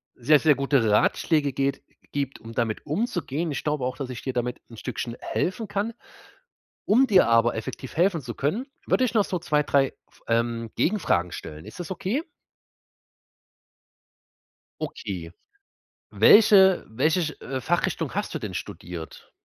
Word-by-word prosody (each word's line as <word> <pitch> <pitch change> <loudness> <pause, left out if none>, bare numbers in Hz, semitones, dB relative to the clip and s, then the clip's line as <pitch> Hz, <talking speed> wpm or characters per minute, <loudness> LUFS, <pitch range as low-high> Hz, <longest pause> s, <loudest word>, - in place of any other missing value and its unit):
sehr, 145 +5 +4
sehr 155 -2 +5
gute 135 -4 +2
Ratschläge 145 +6 +2
geht 140 +1 -1 0.3
gibt, 140 -2 -3
um 115 0 -10
damit 115 -2 -2
umzugehen. 165 - -2
Ich - - -4
glaube 150 -4 -1
auch, 130 - -3
dass 135 -3 -5
ich 115 - -7
dir 130 - -3
damit 125 0 -2
'n 115 - -12
Stückchen 120 +1 -4
helfen 195 +4 -2
kann. 205 +3 -2 0.9
Um 255 +6 +5
dir 190 - +5
aber 115 +1 +4
effektiv 120 +5 -6
helfen 175 -1 +2
zu 120 -1 -6
können, 200 - -1 0.2
würde 255 - +3
ich 245 - 0
noch 210 -3 +4
so 180 - -2
2, 150 -3 +1
3, 135 -2 +3 0.2
F - - -26
ähm, 115 -1 0
Gegenfragen 95 - +1
stellen. 75 +1 -8
Ist - - -10
das 175 - -6
okay? 200 - -2 2.6
Okay. 95 - -5 0.8
Welche 195 -3 +7
welche 155 +10 +1
ch 155 -1 -3 0.3
Fachrichtung 175 0 0
hast - - -2
du - - -3
denn - - -6
studiert? 85 -2 -8
145 Hz, 150 wpm, -25 LUFS, 115-185 Hz, 2.6 s, Welche